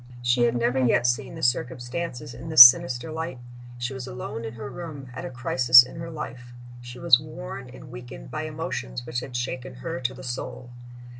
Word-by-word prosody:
She 120 0 +3
had 120 0 0
never 120 +2 0
yet 120 0 +2
seen 125 +2 -1
the - - -9
circumstances 125 +2 -2
in 125 +7 -9
this 140 -6 +12
sinister 120 +3 +3
light. 160 -3 -5 0.4
She 120 +2 -4
was 130 -1 -7
alone 125 -2 -7
in 110 +1 -7
her 115 +4 -7
room, 145 -4 -9
at 130 - -7
a - - -5
crisis 125 0 +6
in 125 - -12
her 165 0 -7
life. 125 -6 -8 0.3
She 120 0 -10
was 125 - +5
worn 90 - -9
and 130 +1 -13
weakened 120 - -10
by - - -4
emotions - - -5
which 120 - -3
had 125 0 -9
shaken 125 +1 -4
her 165 +6 -6
to 130 +1 -3
the 135 - -11
soul. 125 0 -6
125 Hz, 200 wpm, -25 LUFS, 120-130 Hz, 0.4 s, this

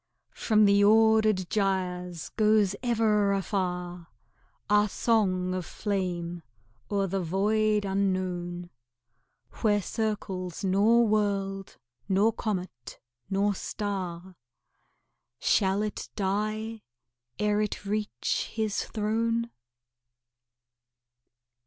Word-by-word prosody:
From 215 -2 +3
the 200 0 +5
ordered 220 -2 +4
gyres 180 -4 -1
goes 210 -2 +3
ever 215 -4 +2
afar 180 -2 -3 0.6
Our 210 0 +3
song 185 -5 +1
of 185 -1 -2
flame 175 -4 -3 0.5
o'er 200 -2 +1
the 195 +1 -2
void 210 +4 +1
unknown, 185 -3 -2 0.9
Where 210 -2 +3
circles 195 -4 -3
nor 210 +5 +4
world, 195 -2 -1 0.3
nor 200 +4 +3
comet, 180 - -5 0.3
nor 200 +1 +1
star, 190 -3 -5 1.0
Shall 195 - +2
it 210 - -5
die 215 +2 -2 0.6
ere 210 0 +1
it 210 -1 -3
reach 205 - -2
His 220 -2 -1
throne? 230 +2 -1
200 Hz, 85 wpm, -28 LUFS, 185-215 Hz, 1.0 s, the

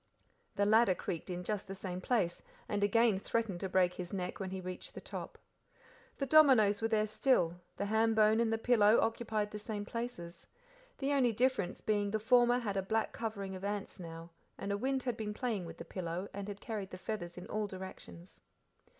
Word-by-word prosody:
The 200 - +2
ladder 215 -2 +5
creaked 170 +1 -5
in 180 0 -3
just 210 +1 -3
the 195 - -6
same 185 -2 -5
place, 185 -7 0 0.3
and 205 -1 -1
again 220 0 +4
threatened 215 -3 -1
to 190 - -3
break 180 -1 +3
his 180 -1 -6
neck 180 -3 -3
when 190 -1 -3
he 190 0 -4
reached 185 0 -7
the - - -5
top. - - -7 0.8
The 275 - -1
dominoes 255 -9 +6
were 225 - +2
there 215 -1 +2
still, 180 - +1 0.2
the 200 - -1
ham 220 +2 +2
bone 215 0 +5
and 230 -1 +2
the 225 - +1
pillow 225 -2 +5
occupied 220 -2 0
the 210 - -5
same 210 -1 -4
places; 230 -8 -6 0.5
the 280 +1 0
only 255 -4 +4
difference 230 -5 0
being 205 -1 +1
the 215 - 0
former 245 +2 +5
had 210 -5 -2
a - - +2
black 220 +3 0
covering 200 -4 -4
of 185 - -8
ants 200 -1 -3
now, 165 -1 -8 0.3
and 200 - -4
a - - +1
wind 265 +3 -1
had 245 -3 -2
been 210 -2 -4
playing 220 -8 -2
with - - -9
the - - -8
pillow, 180 +1 -4
and 200 0 -5
had 205 -1 -7
carried 210 -4 -4
the 185 - -8
feathers 180 -3 -5
in 180 - -7
all 215 0 -2
directions. 185 -2 -10
205 Hz, 205 wpm, -34 LUFS, 190-225 Hz, 0.8 s, dominoes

